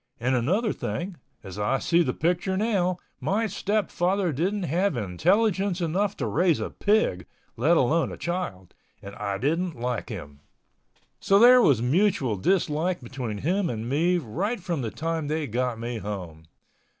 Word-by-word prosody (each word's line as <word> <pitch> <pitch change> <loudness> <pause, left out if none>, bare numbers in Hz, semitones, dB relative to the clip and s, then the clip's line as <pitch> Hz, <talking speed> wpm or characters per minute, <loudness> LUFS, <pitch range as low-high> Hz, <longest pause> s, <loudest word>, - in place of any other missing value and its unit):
And 125 +3 0
another 185 - +1
thing, 175 0 -4 0.3
as 95 0 -8
I 105 +6 +1
see 170 +5 +2
the 135 -7 +1
picture 175 +6 0
now, 190 -4 +1 0.2
my 220 +4 0
stepfather 195 -3 0
didn't 185 +8 -1
have 175 0 0
intelligence 185 - +1
enough 185 +4 0
to - - -2
raise 175 -4 +2
a - - -4
pig, 205 - +1 0.3
let 155 +9 +3
alone 160 +5 +2
a - - -7
child, 170 - -4 0.3
and 100 0 -8
I 100 -1 -2
didn't 160 - -1
like 125 0 -3
him. 75 -10 -8 0.8
So 195 - +3
there 245 +3 +8
was 135 - +4
a - - -1
mutual 140 - +2
dislike 170 - 0
between 120 -3 -5
him 185 +1 +1
and 115 0 -4
me 165 +7 +2
right 175 - -2
from 170 -5 -3
the 115 - -2
time 160 +3 -3
they 155 +1 -1
got 125 0 -1
me 120 0 -4
home. 90 -6 -7
165 Hz, 160 wpm, -26 LUFS, 120-190 Hz, 0.8 s, there